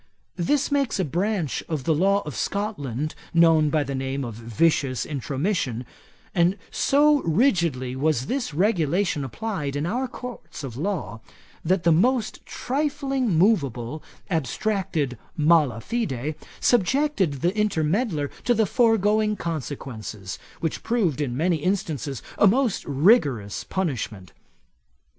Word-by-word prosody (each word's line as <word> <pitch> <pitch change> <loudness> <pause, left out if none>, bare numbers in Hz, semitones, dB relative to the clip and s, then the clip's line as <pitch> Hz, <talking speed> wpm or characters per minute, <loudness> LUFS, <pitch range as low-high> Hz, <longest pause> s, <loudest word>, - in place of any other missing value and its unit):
This 280 - +1
makes 275 -7 +1
a 185 - +2
branch 175 0 -1
of 155 -5 -2
the 160 - +2
law 195 +5 +2
of 150 - -5
Scotland, 155 - -2 0.2
known 165 -2 +5
by 155 -1 +2
the 140 0 -4
name 135 0 -2
of 115 - -5
vicious 130 +4 0
intromission; 140 - -2 0.5
and 175 +2 +3
so 295 +1 +4
rigidly 165 - +1
was 140 -2 +1
this 260 - -2
regulation 175 -2 +1
applied 150 - -4
in 145 +2 -1
our 250 +9 -1
Courts 245 -9 -8
of 125 -4 -6
Law, 140 - -3 0.4
that 180 +1 +1
the 170 - +4
most 220 +7 +2
trifling 275 - -1
moveable 150 - +1 0.3
abstracted 165 - -1 0.2
mala 150 -7 +4
fide, 155 - -2 0.3
subjected 235 - +2
the 180 +4 +2
intermeddler 185 - 0
to 240 - +3
the 220 0 +3
foregoing 215 -1 +3
consequences, 130 - -5 0.2
which 160 - -2
proved 195 - 0
in 125 -4 -2
many 170 +2 +2
instances 155 - -2 0.2
a 205 - +7
most 240 +1 +2
rigorous 140 - +2
punishment. 115 - -3
165 Hz, 125 wpm, -24 LUFS, 140-210 Hz, 0.5 s, a